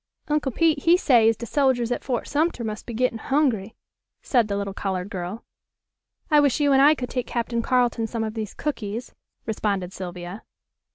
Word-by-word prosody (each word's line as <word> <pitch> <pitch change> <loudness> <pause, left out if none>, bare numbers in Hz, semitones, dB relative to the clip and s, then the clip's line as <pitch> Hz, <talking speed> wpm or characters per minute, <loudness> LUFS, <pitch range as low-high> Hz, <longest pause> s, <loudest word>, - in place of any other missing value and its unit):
"Uncle 295 -2 +1
Pete 320 +3 +2
he 340 +2 +6
say 240 -10 +5
as 225 - 0
de 235 - -6
soldiers 250 -2 +1
at 245 - -2
Fort 245 -3 -2
Sumter 300 -4 0
mus' 215 -1 -4
be 235 - -8
gettin' 245 -1 0
hungry," 240 -7 0 0.5
said 240 -5 +2
the 200 -1 -2
little 200 -1 -3
colored 190 0 -3
girl. 185 +3 -5 0.9
"I 300 - +7
wish 285 -2 +3
you 285 -1 +3
and 270 - +5
I 295 +2 +7
could 250 -3 -5
take 250 -2 -2
Captain 235 0 -1
Carleton 240 -2 +1
some 230 0 -3
of 220 -1 -3
these 220 -2 -5
cookies," 235 -5 -4 0.3
responded 200 -4 -2
Sylvia. 180 +2 -7
235 Hz, 185 wpm, -24 LUFS, 210-270 Hz, 0.9 s, I